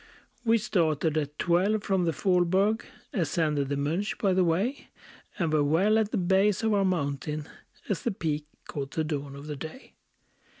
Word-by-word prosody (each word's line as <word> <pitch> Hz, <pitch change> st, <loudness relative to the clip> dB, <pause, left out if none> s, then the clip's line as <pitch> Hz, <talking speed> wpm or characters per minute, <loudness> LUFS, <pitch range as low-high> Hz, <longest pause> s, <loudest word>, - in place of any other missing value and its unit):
We 230 Hz, -1 st, +4 dB
started 165 Hz, -8 st, +1 dB
at 150 Hz, -1 st, -2 dB
twelve 195 Hz, +5 st, +2 dB
from 190 Hz, -3 st, +1 dB
the 165 Hz, -, +2 dB
Faulberg; 185 Hz, +6 st, +2 dB, 0.3 s
Ascended 150 Hz, -5 st, 0 dB
the 140 Hz, -, -1 dB
Monch 165 Hz, +9 st, -1 dB
by 195 Hz, -3 st, +2 dB
the 185 Hz, 0 st, +3 dB
way; 190 Hz, +11 st, 0 dB, 0.5 s
And 165 Hz, -5 st, 0 dB
were 150 Hz, -1 st, +4 dB
well 190 Hz, +9 st, +3 dB
at 215 Hz, -2 st, +1 dB
the -, -, -1 dB
base 190 Hz, +3 st, +2 dB
of 220 Hz, -1 st, +2 dB
our 200 Hz, -1 st, +3 dB
mountain, 150 Hz, -4 st, -1 dB, 0.4 s
As 200 Hz, -, -1 dB
the -, -, 0 dB
peak 155 Hz, -7 st, -2 dB, 0.2 s
caught 140 Hz, -2 st, -4 dB
the 160 Hz, -, -1 dB
dawn 145 Hz, -3 st, -4 dB
of 140 Hz, +1 st, -9 dB
the 150 Hz, -1 st, -4 dB
day. 160 Hz, -, -9 dB
170 Hz, 175 wpm, -28 LUFS, 150-200 Hz, 0.5 s, We